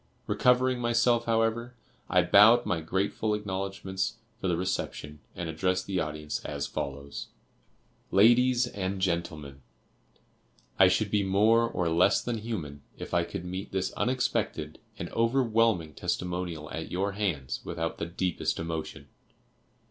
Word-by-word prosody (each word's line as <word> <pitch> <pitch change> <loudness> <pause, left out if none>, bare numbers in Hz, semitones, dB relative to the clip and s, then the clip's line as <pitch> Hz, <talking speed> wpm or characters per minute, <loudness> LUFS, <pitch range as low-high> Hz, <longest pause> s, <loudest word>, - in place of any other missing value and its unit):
Recovering 125 0 +3
myself, 120 0 +2
however, 115 +1 0 0.3
I 90 -1 +4
bowed 105 +7 +7
my 85 -3 -1
grateful 100 +5 -1
acknowledgments 95 -1 -3 0.2
for - - -2
the 85 -2 +1
reception, 85 -4 -3 0.2
and 85 - -4
addressed 90 +3 0
the 95 -2 -1
audience 75 -1 -4
as 70 -1 -3
follows: 70 0 -5 0.8
"LADIES 120 +4 +5
AND 100 -4 -3
GENTLEMEN: 80 -6 -2 1.2
I 95 - +8
should 100 +2 +1
be 105 - +3
more 110 +4 +3
or 90 - -1
less 85 +4 +4
than 120 -2 -3
human, 85 -11 -5 0.2
if - - -8
I 85 -1 +3
could 85 +1 -6
meet 95 +2 -5
this 95 0 -1
unexpected 120 -11 -1 0.2
and - - -4
overwhelming 115 - +2
testimonial 90 -2 -3
at 80 - -5
your 95 +3 -1
hands, 85 - -2
without 80 -1 -4
the 85 - -2
deepest 90 0 -1
emotion. 80 -1 -5
95 Hz, 135 wpm, -28 LUFS, 85-115 Hz, 1.2 s, I